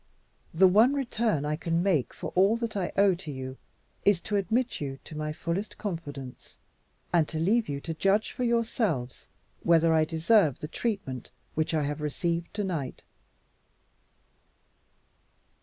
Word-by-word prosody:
The 190 Hz, +4 st, +6 dB
one 220 Hz, +9 st, +5 dB
return 230 Hz, -, 0 dB
I 150 Hz, +1 st, 0 dB
can 165 Hz, +2 st, 0 dB
make 175 Hz, -10 st, +1 dB
for -, -, -6 dB
all 195 Hz, +5 st, +4 dB
that 230 Hz, -2 st, -4 dB
I 190 Hz, -3 st, -1 dB
owe 200 Hz, -1 st, +5 dB
to 170 Hz, -3 st, -6 dB
you 130 Hz, -1 st, -6 dB, 0.5 s
is 200 Hz, -3 st, +4 dB
to 210 Hz, -, -3 dB
admit 225 Hz, +5 st, 0 dB
you 135 Hz, -2 st, -4 dB
to 155 Hz, -, -10 dB
my 150 Hz, 0 st, -2 dB
fullest 170 Hz, +7 st, -3 dB
confidence, 145 Hz, -10 st, -7 dB, 0.6 s
and 165 Hz, -3 st, +4 dB
to 160 Hz, -, -5 dB
leave 210 Hz, +7 st, +2 dB
you 140 Hz, -1 st, -2 dB
to 165 Hz, -, -4 dB
judge 195 Hz, +6 st, +2 dB
for 250 Hz, -, -4 dB
yourselves 225 Hz, -, 0 dB, 0.3 s
whether 165 Hz, -1 st, +4 dB
I 160 Hz, -1 st, +4 dB
deserve 160 Hz, -, +3 dB
the 150 Hz, -, -6 dB
treatment 160 Hz, -, -3 dB, 0.2 s
which 155 Hz, +1 st, 0 dB
I 155 Hz, -, +1 dB
have 145 Hz, +1 st, -3 dB
received 170 Hz, +3 st, -2 dB
to 205 Hz, -, -1 dB
night." 160 Hz, -9 st, -4 dB
170 Hz, 155 wpm, -28 LUFS, 150-205 Hz, 0.6 s, The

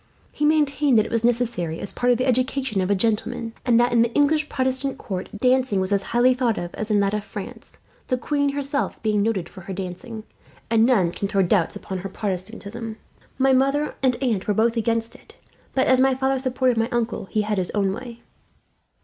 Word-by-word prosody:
He 295 Hz, -, -1 dB
maintained 295 Hz, -3 st, +3 dB
that 215 Hz, -, +4 dB
it -, -, -7 dB
was 230 Hz, -1 st, 0 dB
necessary, 230 Hz, -9 st, 0 dB
as 200 Hz, -, -4 dB
part 245 Hz, 0 st, +2 dB
of 245 Hz, -, +3 dB
the 255 Hz, -, 0 dB
education 255 Hz, -4 st, 0 dB
of 185 Hz, -, -1 dB
a 205 Hz, -, +3 dB
gentleman; 225 Hz, +2 st, -1 dB
and 235 Hz, -2 st, +4 dB
that 240 Hz, 0 st, +2 dB
in 235 Hz, -, +5 dB
the 235 Hz, 0 st, +2 dB
English 300 Hz, +1 st, +2 dB
Protestant 260 Hz, +1 st, -1 dB
court, 185 Hz, -3 st, -5 dB
dancing 255 Hz, -3 st, +2 dB
was 190 Hz, +1 st, -1 dB
as 200 Hz, -1 st, +2 dB
highly 240 Hz, +5 st, +3 dB
thought 245 Hz, -3 st, 0 dB
of 175 Hz, 0 st, -5 dB
as 215 Hz, -, -4 dB
in 210 Hz, -1 st, +3 dB
that 200 Hz, 0 st, +1 dB
of 210 Hz, -1 st, -1 dB
France, -, -, -9 dB, 0.3 s
the 255 Hz, -, 0 dB
queen 285 Hz, +3 st, 0 dB
herself 285 Hz, 0 st, -2 dB
being 210 Hz, -2 st, +2 dB
noted 200 Hz, -4 st, 0 dB
for 190 Hz, -, -12 dB
her 190 Hz, +2 st, -7 dB
dancing, 195 Hz, +5 st, -6 dB, 0.5 s
and 225 Hz, 0 st, +4 dB
none 195 Hz, -10 st, +3 dB
can 200 Hz, -, -3 dB
throw 195 Hz, -1 st, +2 dB
doubts 180 Hz, -2 st, +1 dB
upon 190 Hz, -1 st, -5 dB
her 195 Hz, +2 st, -6 dB
Protestantism. 215 Hz, +3 st, -5 dB, 0.4 s
My 265 Hz, 0 st, +3 dB
mother 275 Hz, +3 st, +2 dB
and 260 Hz, -2 st, +3 dB
aunt 220 Hz, -7 st, 0 dB
were 210 Hz, -, +1 dB
both 230 Hz, +2 st, +2 dB
against 230 Hz, 0 st, -1 dB
it, -, -, -17 dB, 0.4 s
but 265 Hz, -, +3 dB
as 260 Hz, 0 st, +4 dB
my 265 Hz, 0 st, +4 dB
father 265 Hz, 0 st, 0 dB
supported 255 Hz, -2 st, +1 dB
my 225 Hz, +1 st, +1 dB
uncle, 235 Hz, -4 st, -2 dB
he 210 Hz, +2 st, -1 dB
had 210 Hz, -1 st, -1 dB
his 180 Hz, -, 0 dB
own 195 Hz, -2 st, +1 dB
way." 235 Hz, +2 st, -9 dB
230 Hz, 215 wpm, -23 LUFS, 205-260 Hz, 0.5 s, in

